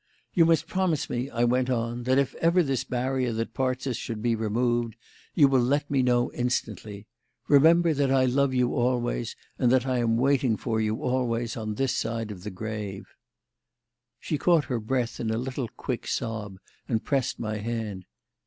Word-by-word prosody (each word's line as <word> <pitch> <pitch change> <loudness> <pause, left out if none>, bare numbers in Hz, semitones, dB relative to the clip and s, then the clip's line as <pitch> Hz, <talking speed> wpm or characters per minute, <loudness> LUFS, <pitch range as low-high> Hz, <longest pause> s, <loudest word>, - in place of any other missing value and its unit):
"You 165 - +5
must 165 -1 +3
promise 185 -6 -1
me," 125 +3 -2
I 120 -2 -1
went 125 +1 +2
on, 120 0 -2
"that 130 +1 +3
if 140 -1 +1
ever 170 +2 +3
this 135 -4 -1
barrier 130 0 -1
that 115 +1 -3
parts 130 0 -1
us 125 -4 -1
should 115 -3 -5
be 115 +1 +1
removed, 115 +1 0 0.4
you 145 -4 +6
will 135 -2 +3
let 140 +4 0
me 135 -2 +3
know 125 -1 +2
instantly. 110 -4 -3 0.4
Remember 165 +3 +5
that 140 -2 +1
I 130 -1 +4
love 135 +2 +2
you 125 -1 +1
always, 120 -1 0 0.2
and 125 -3 +3
that 130 -1 +3
I 130 -2 0
am 115 -1 +2
waiting 130 -3 +2
for 110 -3 -1
you 110 0 0
always 120 -2 -1
on 110 -2 -4
this 135 +2 0
side 115 -1 -2
of 95 -3 -9
the 105 - -4
grave." 105 0 -6 1.1
She 150 - -3
caught 170 -2 +3
her 125 -4 -2
breath 120 +2 -2
in 115 - -2
a 110 - 0
little 130 +1 -3
quick 120 +2 -5
sob, 110 -5 -3 0.3
and 110 -3 0
pressed 135 -1 0
my 110 -1 -3
hand. 105 -4 -4
125 Hz, 185 wpm, -27 LUFS, 115-135 Hz, 1.1 s, you